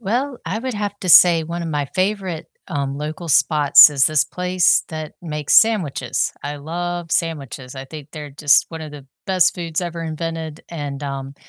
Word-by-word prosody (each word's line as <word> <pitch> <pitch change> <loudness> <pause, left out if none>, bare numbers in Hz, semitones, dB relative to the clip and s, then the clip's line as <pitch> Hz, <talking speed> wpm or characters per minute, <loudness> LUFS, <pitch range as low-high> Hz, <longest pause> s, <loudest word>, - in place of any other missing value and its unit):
Well, 245 +5 -2
I 195 +6 -2
would 255 -1 -5
have 205 -1 -4
to 185 - -5
say 170 -1 +7
one 170 +1 -5
of 165 - -5
my 145 -3 -2
favorite, 190 -3 -2 0.2
um, 140 -4 -3
local 155 +3 -6
spots 150 0 +6
is 140 -2 +3
this 155 -1 +3
place 180 0 +1
that 155 -1 -7
makes 150 -3 -2
sandwiches. 215 -11 -1
I 145 +1 -5
love 175 +3 -5
sandwiches, 140 -6 -3
I 135 - -7
think 150 0 -11
they're 150 -2 -8
just 145 +1 +3
one 165 -1 -7
of 155 - -8
the 140 -2 -12 0.2
best 185 -2 +3
foods 165 -2 -3
ever 170 -1 -5
invented, 160 -1 -5
and, 145 -4 -6
um, 135 -1 -6
160 Hz, 185 wpm, -19 LUFS, 145-180 Hz, 0.2 s, say